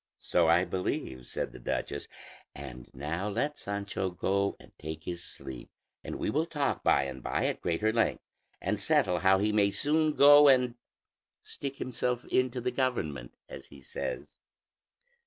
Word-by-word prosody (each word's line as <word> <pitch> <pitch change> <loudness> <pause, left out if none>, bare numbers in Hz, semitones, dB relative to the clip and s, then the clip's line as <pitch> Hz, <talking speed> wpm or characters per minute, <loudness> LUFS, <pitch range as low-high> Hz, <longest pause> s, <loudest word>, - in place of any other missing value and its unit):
"So 85 -2 +3
I 85 +3 +4
believe," 75 -8 -3
said - - -3
the - - -11
duchess; 70 - -3 0.5
"and 65 -3 -9
now 85 +9 -3
let 145 +9 -1
Sancho 100 -1 -3
go 100 +2 0
and - - -17
take 80 0 -6
his 85 0 -5
sleep, 65 -7 -9 0.3
and - - -5
we - - -3
will 155 +4 0
talk 145 -4 -1
by - - +4
and 65 -1 -6
by - - -1
at - - -1
greater 105 +6 0
length, 115 - +1 0.4
and - - -1
settle 90 -1 +2
how 95 +2 +5
he 105 +2 +1
may 105 -1 +3
soon 155 +7 +1
go 145 +1 +8
and 125 -3 +5 0.7
stick 140 -1 -6
himself 125 -1 -2
into 130 0 +1
the 125 +1 -1
government, 100 - -2
as 70 - -10
he 70 - -14
says." 65 +2 -5
100 Hz, 160 wpm, -30 LUFS, 80-125 Hz, 0.7 s, go